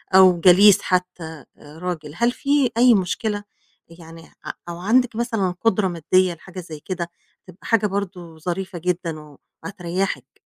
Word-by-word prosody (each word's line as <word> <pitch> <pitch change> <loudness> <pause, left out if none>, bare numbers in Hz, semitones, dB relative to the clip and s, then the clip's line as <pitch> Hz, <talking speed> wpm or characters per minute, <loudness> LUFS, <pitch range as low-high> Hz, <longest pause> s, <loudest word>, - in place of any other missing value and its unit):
أو 185 -2 +7
جليس 190 +3 +7
حتّى 180 -1 -1 0.3
آآ 150 +2 -14
راجل؟ 165 -5 -4
هل 235 +1 +2
في 280 -2 +1
أي 245 0 +6
مشكلة؟ 205 +2 -1 0.6
يعني 165 0 -13 0.2
ع - - -3 0.2
أو 170 0 -6
عندِك 230 +4 +2
مثلًا 225 -6 -1
قُدرة 210 -3 +2
مادّية 180 +1 +1
لحاجة 185 +3 -11
زي 160 -4 -9
كده، 170 0 -5 0.4
تبقى 185 +1 -13
حاجة 220 -2 +3
برضه 180 -4 -5
ظريفة 180 +2 -4
جدًا 160 -4 -4 0.3
وهتريّحِك؟ 180 -8 -4
185 Hz, 140 wpm, -22 LUFS, 170-205 Hz, 0.6 s, أو